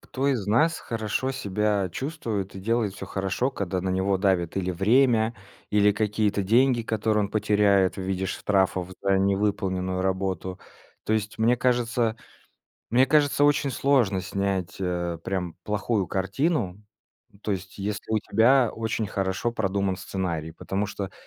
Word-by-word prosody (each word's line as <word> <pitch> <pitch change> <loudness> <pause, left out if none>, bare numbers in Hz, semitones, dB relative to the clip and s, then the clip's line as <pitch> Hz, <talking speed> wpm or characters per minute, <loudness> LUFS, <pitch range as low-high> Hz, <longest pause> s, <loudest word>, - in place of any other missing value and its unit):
Кто 135 +2 -2
из 115 -8 0
нас 160 +10 +3
хорошо 115 +4 -2
себя 105 -4 0
чувствует 115 - -4
и 95 - -7
делает 110 -1 0
всё 95 - -7
хорошо, 95 +7 -1
когда 95 -7 -3
на 95 - -2
него 95 +1 +1
давит 95 -3 +1
или 95 -1 0
время, 115 +4 +3 0.4
или 105 0 +4
какие-то 105 -1 0
деньги, 120 +4 +3
которые 110 -1 0
он 100 - -5
потеряет 105 -3 +3
в 95 - -4
виде 95 0 -2
штрафов 95 -2 0
за 95 -1 +3
невыполненную 95 -2 0
работу. 95 -1 -2 0.4
То - - -1
есть, 105 0 -2
мне 120 +2 +3
кажется 120 -2 +1 0.8
мне 125 +3 +5
кажется 145 0 +3
очень 145 -1 +2
сложно 125 -7 +2
снять, 95 -2 -2
э, 85 -2 -2
прям 90 -4 -3
плохую 105 -2 -1
картину, 100 - -1 0.5
ну 100 - -22
то 105 - -2
есть, 95 0 -7
если 105 +2 -4
у 110 - +3
тебя 120 +4 +3
очень 110 -1 -2
хорошо 95 +5 -1
продуман 100 -3 0
сценарий. 85 -4 -3
Потому 95 +4 -2
что 100 -1 -5
100 Hz, 150 wpm, -26 LUFS, 95-115 Hz, 0.8 s, мне